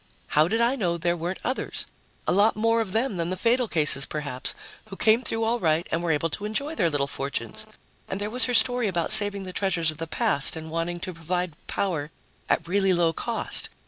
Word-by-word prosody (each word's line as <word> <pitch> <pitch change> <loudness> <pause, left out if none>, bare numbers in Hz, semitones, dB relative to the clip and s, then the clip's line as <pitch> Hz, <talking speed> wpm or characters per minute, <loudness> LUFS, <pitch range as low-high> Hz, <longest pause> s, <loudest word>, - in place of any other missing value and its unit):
How 155 +1 +3
did 225 +5 0
I 240 +3 +2
know 175 -9 -1
there 170 +1 0
weren't 175 +3 -4
others 255 - -2 0.4
a - - 0
lot 205 +4 +3
more 230 +2 +2
of 210 -4 -4
them 225 0 -1
than 170 0 -2
the 185 - -3
fatal 240 +4 +1
cases, 150 -6 +4
perhaps 140 -4 -1 0.3
who 205 -3 -10
came 220 +4 +3
through 225 -1 -1
all 235 +2 0
right 165 -1 +1
and 165 - 0
were 175 - -2
able 160 +1 0
to 205 - -4
enjoy 280 +9 -2
their 175 - +1
little 145 -2 0
fortunes? 135 -5 -4 0.4
And 190 - -4
there 205 +1 -4
was 250 +2 +4
her 250 - -2
story 245 +1 +4
about 175 -4 0
saving 200 -1 +6
the 185 -1 -8
treasures 175 -5 0
of 155 - -12
the 165 +1 -5
past 140 -2 +2
and 160 0 -8
wanting 165 +1 -3
to 185 - -5
provide 175 +1 -3
power 160 -7 -2 0.4
at - - 0
really 195 +1 +2
low 170 -2 +2
cost. 235 +5 -2
185 Hz, 220 wpm, -25 LUFS, 165-220 Hz, 0.4 s, saving